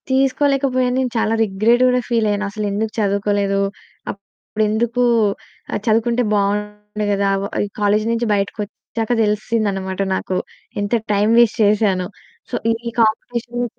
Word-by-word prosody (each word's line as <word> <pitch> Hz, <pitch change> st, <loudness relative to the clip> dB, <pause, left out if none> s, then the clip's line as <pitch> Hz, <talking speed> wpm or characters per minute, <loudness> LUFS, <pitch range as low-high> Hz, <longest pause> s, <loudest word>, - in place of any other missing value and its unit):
తీసుకోలేకపోయాను 265 Hz, -1 st, +2 dB
నేను 255 Hz, -2 st, -1 dB
చాలా 225 Hz, 0 st, +1 dB
రిగ్రేట్ 220 Hz, +4 st, +2 dB
గూడా 250 Hz, 0 st, +3 dB
ఫీలయ్యాను. 210 Hz, -3 st, +1 dB
అసలెందుకు 210 Hz, +1 st, -2 dB
చదువుకోలేదు 200 Hz, -1 st, +1 dB, 0.5 s
అప్పుడెందుకు 220 Hz, +4 st, -2 dB, 0.7 s
ఆహ్, -, -, 0 dB
చదువుకుంటే 230 Hz, +2 st, +2 dB
బావుండే 210 Hz, +1 st, -1 dB
గదా! 200 Hz, 0 st, +1 dB, 0.4 s
ఈ -, -, -6 dB
కాలేజు 210 Hz, +1 st, +2 dB
నుంచి 230 Hz, 0 st, 0 dB
బయటికొచ్చాక 210 Hz, +3 st, -3 dB
తెలిసిందనమాట 210 Hz, -3 st, -1 dB
నాకు. 185 Hz, 0 st, -2 dB, 0.4 s
ఎంత 205 Hz, +3 st, -2 dB, 0.2 s
టైమ్ 205 Hz, +2 st, +3 dB
వేస్ట్ 235 Hz, -2 st, +3 dB
చేశానో. 200 Hz, -3 st, +2 dB, 0.4 s
సో, -, -, -3 dB, 0.3 s
ఈ -, -, -8 dB
కాంపిటీషన్ 240 Hz, +2 st, -1 dB
215 Hz, 115 wpm, -19 LUFS, 205-235 Hz, 0.7 s, గూడా